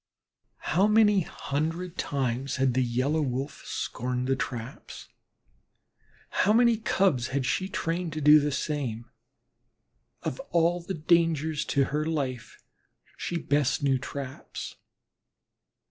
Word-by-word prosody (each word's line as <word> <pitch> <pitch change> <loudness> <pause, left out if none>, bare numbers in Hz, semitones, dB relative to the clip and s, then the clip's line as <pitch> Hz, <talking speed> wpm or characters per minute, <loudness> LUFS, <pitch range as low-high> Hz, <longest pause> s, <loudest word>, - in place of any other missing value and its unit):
How 190 +6 +4
many 210 -2 +5
hundred 165 +4 -3
times 135 -3 -1
had 130 -2 +2
the 130 - +2
Yellow 130 +6 +1
Wolf 135 +1 -3
scorned 125 +1 -3
the 135 - +2
traps; 125 -1 -6 1.2
how 210 - +3
many 235 0 +5
Cubs 185 - +1 0.2
she 185 - 0
had 190 - -9
trained 165 0 -1
to 155 - -3
do 150 +1 +8
the 145 0 0
same! 130 -6 -2 1.2
Of 130 - -3
all 170 +1 +2
the 185 +3 -4
dangers 160 -1 +2
to 140 - +2
her 150 +3 -1
life 140 -7 -3 0.6
she 175 - -3
best 145 -2 +1
knew 135 -2 +3
traps. 135 0 -7
150 Hz, 120 wpm, -27 LUFS, 130-170 Hz, 1.2 s, do